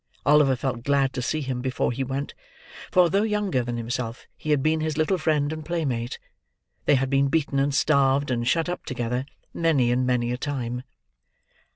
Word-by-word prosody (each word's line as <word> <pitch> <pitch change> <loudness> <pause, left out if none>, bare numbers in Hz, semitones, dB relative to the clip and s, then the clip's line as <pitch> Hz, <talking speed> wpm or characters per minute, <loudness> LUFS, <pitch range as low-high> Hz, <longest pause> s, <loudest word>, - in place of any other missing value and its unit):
Oliver 145 -2 +5
felt 125 -1 -3
glad 140 -1 +2
to 125 - -3
see 155 +5 -1
him, 130 -3 -3
before 130 -1 -1
he 130 +3 -2
went; 135 +2 -4 0.6
for, 180 -1 +5
though 195 +4 +2
younger 210 - 0
than 120 0 -3
himself, 115 0 -4
he 155 - -7
had 145 -3 +2
been 155 +1 +2
his 155 -1 -2
little 170 +4 +1
friend 150 -1 +1
and 155 0 -6
playmate. 140 -8 -2 0.7
They 145 - +5
had 135 0 0
been 140 0 +3
beaten, 140 -2 0
and 140 +1 +2
starved, 140 -1 +2
and 120 -1 -1
shut 165 +5 +2
up 180 - -4
together, 125 +1 -2 0.3
many 145 -8 +2
and 125 +1 +1
many 120 -1 +1
a 125 - -2
time. 125 -3 -3
135 Hz, 190 wpm, -25 LUFS, 125-155 Hz, 0.7 s, Oliver